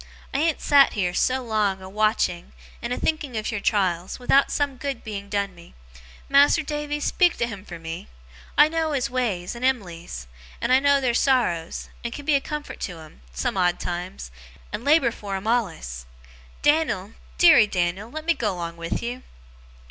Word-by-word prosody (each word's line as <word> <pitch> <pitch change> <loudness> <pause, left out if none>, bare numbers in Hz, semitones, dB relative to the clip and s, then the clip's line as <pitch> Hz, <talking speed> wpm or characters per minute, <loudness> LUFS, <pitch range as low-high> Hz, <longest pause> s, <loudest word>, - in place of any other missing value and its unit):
I 275 - +1
ain't 320 0 +1
sat 280 -1 +5
here, 180 -4 0
so 255 +7 +1
long, 210 -4 0
a 185 - -10
watching, 205 -3 0 0.3
and 235 - -4
a - - -1
thinking 295 -7 -1
of 215 - -2
your 220 - -2
trials, 185 -4 0
without 270 +2 +3
some 285 -3 -1
good 275 -2 -4
being 200 -2 -6
done 200 -2 -1
me. 170 -1 -16 0.5
Mas'r 285 +3 +5
Davy, 295 0 -3
speak 350 +4 +2
to 235 - +1
him 205 -5 -7
for 175 -4 -8
me! 165 +1 -7 0.5
I 300 - +8
knows 320 -1 -1
his 250 -3 0
ways, 215 -9 -1
and 240 +1 -8
Em'ly's, 180 - -2 0.3
and 250 - +1
I 260 - +7
knows 280 0 +3
their 245 -2 +2
sorrows, 235 -12 +1
and 235 - -3
can 285 +3 -8
be 310 - +3
a 280 - +3
comfort 300 +1 -6
to 180 -3 -5
'em, 155 - -14
some 65 - -2
odd 180 -1 +2
times, 175 - -5 0.4
and 225 - -4
labour 285 -4 +4
for 200 -3 -5
'em 190 +1 -5
allus! 165 - -1 0.6
Dan'l, 295 -10 +2 0.2
deary 315 -11 +7
Dan'l, 185 +3 -1
let 310 +4 -7
me 340 - +4
go 210 - -1
'long 170 -1 -5
with 170 +5 -3
you! 245 +2 -4
225 Hz, 185 wpm, -24 LUFS, 180-280 Hz, 0.6 s, I